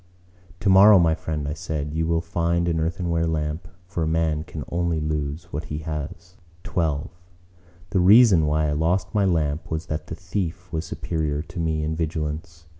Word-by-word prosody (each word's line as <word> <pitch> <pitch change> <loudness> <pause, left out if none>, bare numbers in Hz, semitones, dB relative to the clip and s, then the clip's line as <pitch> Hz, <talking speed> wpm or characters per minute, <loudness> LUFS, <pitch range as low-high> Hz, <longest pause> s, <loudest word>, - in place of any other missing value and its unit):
"Tomorrow, 100 +1 +7
my 85 -3 +4
friend," 80 -2 -4
I 75 - -2
said, 75 -2 -4
"you 80 +1 0
will 85 0 +1
find 85 +1 0
an 80 -1 +1
earthenware 85 0 0
lamp; 75 +1 -2 0.2
for 90 -1 -4
a 80 - +1
man 80 -1 0
can 80 -1 -7
only 85 -1 0
lose 75 0 -3
what 75 +3 -3
he 75 - -4
has." 80 +4 -6 0.3
XII 80 -5 -1 0.8
The 95 - +2
reason 95 -3 +6
why 75 +1 +1
I - - 0
lost 85 +5 0
my 105 -2 +3
lamp 80 -4 0
was 80 +1 -3
that 75 0 -4
the 80 - -5
thief 90 0 -4
was 80 +1 -2
superior 75 -3 -2
to 80 - -8
me 80 -2 0
in 80 +1 -1
vigilance. 80 0 -4
80 Hz, 180 wpm, -24 LUFS, 75-85 Hz, 0.8 s, Tomorrow